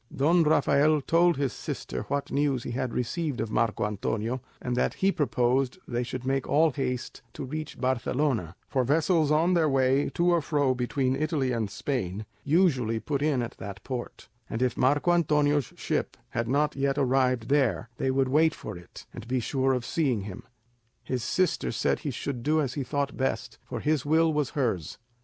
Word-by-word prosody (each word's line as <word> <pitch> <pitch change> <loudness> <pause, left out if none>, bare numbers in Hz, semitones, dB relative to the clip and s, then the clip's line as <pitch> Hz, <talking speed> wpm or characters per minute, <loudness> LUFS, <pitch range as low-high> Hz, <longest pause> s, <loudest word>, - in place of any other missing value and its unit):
Don 165 +6 +3
Rafael 150 0 +4
told 170 +3 +3
his 140 -3 -1
sister 65 +1 -5
what 140 0 -2
news 140 -4 +1
he - - -5
had 125 0 -2
received 140 +3 -2
of 110 -1 -2
Marco 110 -1 +1
Antonio, 110 +4 -2 0.2
and 125 -1 -2
that - - 0
he 195 +1 +2
proposed 130 - +1
they 120 0 -1
should 125 +1 -5
make 135 0 0
all 160 +2 +4
haste 125 -2 -3
to - - -6
reach 155 +3 -6
Barcelona; 130 - 0
for 130 - +1
vessels 155 +3 +2
on 160 +4 +3
their 165 -3 +3
way 135 +1 +2
to 175 +1 +3
or 170 -1 +3
fro 145 -3 +1
between 130 +1 0
Italy 150 -4 0
and 115 -4 -1
Spain 105 -5 -3 0.2
usually 135 - +2
put 140 +3 -2
in 145 -5 +1
at 115 - -6
that 100 0 -7
port; 125 -2 -6 0.2
and 115 +3 -1
if 125 -2 +1
Marco 145 +6 +3
Antonio's 150 -4 +2
ship - - -2
had 115 0 -2
not 145 +4 +1
yet 135 0 0
arrived 130 -3 +2
there, 135 -5 +2
they 135 - 0
would 135 0 +2
wait 155 +4 +3
for 105 - -7
it, 85 -1 -12
and 115 - -9
be 130 +1 0
sure 135 +2 0
of 125 -2 -1
seeing 130 -10 0
him. 100 +3 -7 0.6
His 125 -2 -3
sister 185 +7 0
said - - 0
he 150 - -4
should 125 0 -4
do 155 +5 +2
as 135 -4 -1
he 140 - -2
thought 140 +2 -2
best, 130 - -2
for - - -5
his 150 -2 +1
will 160 +2 +3
was 150 -3 0
hers. 110 - -1
135 Hz, 190 wpm, -27 LUFS, 125-150 Hz, 0.6 s, Rafael